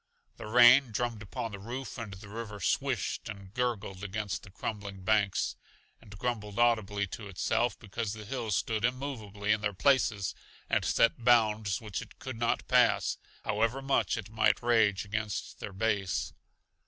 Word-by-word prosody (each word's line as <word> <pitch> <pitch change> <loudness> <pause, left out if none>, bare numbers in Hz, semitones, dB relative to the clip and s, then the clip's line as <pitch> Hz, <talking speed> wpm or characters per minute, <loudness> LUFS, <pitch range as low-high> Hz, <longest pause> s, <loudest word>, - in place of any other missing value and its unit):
The - - -7
rain 120 +3 +7
drummed 115 0 -2
upon 110 +2 -5
the 100 - -7
roof 120 +2 -6
and 110 -3 -5
the 100 +2 -12
river 105 -1 -6
swished 125 -2 -1
and 100 -2 -9
gurgled 105 -6 -2
against 105 0 -3
the - - -13
crumbling 100 -1 -6
banks, 100 -1 +2 0.5
and 100 -3 -13
grumbled 105 -2 -3
audibly 110 -4 +2
to 100 +3 -8
itself 100 +3 0
because 110 0 -4
the 110 -1 -8
hills 110 -4 -1
stood 110 -1 -1
immovably 115 -5 -2
in 105 -1 +2
their 105 -2 -1
places 110 -4 +2 0.3
and - - +1
set 115 +1 +2
bounds 110 -4 +3
which 105 -5 -4
it - - -12
could 130 -3 -7
not 120 0 0
pass, - - +3 0.3
however 110 +4 +1
much 135 -3 +1
it 105 -2 -7
might 110 0 +2
rage 110 -5 +3
against 105 -6 -3
their - - -6
base. 100 -1 -1
110 Hz, 160 wpm, -30 LUFS, 100-120 Hz, 0.5 s, rain